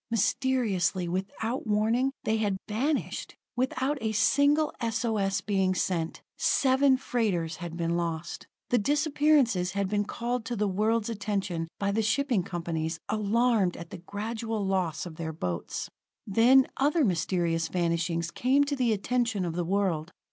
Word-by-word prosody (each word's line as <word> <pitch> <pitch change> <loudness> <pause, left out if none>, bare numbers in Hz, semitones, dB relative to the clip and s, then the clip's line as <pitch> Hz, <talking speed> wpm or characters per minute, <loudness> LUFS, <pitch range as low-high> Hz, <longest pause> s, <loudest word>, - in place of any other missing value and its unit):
Mysteriously, 215 -5 +1
without 200 +7 -3
warning, 225 +5 +2
they 220 +1 +1
had 205 -3 0
vanished; 270 +8 -2 0.2
without 260 +3 0
a 220 -1 -1
single 285 +7 +3
S 230 +1 -1
O 225 -2 0
S 195 0 0
being 190 -2 +1
sent, 170 -3 -2
seven 265 0 +3
freighters 195 -11 -1
had 170 -1 -6
been 170 0 0
lost. 170 -1 -3 0.2
The 245 - +3
disappearances 285 - +2
had 200 -1 0
been 205 +1 0
called 240 +2 -3
to 245 - -3
the 210 -1 0
world's 215 +3 +1
attention 195 -6 -2
by 200 0 0
the 220 +2 +1
shipping 240 0 +1
companies, 165 -2 -3
alarmed 215 -2 +2
at 170 -1 -9
the 190 - -7
gradual 215 +3 -4
loss 185 -5 -1
of 165 -3 -9
their 160 -1 -3
boats. 90 - -4 0.4
Then 240 +6 +5
other 290 +2 +3
mysterious 170 -3 0
vanishings 170 -1 -1
came 265 +7 +3
to 285 0 -1
the 245 -4 +2
attention 225 -2 0
of 170 - -3
the 175 +1 -1
world. 180 -3 0
205 Hz, 150 wpm, -28 LUFS, 175-245 Hz, 0.4 s, Then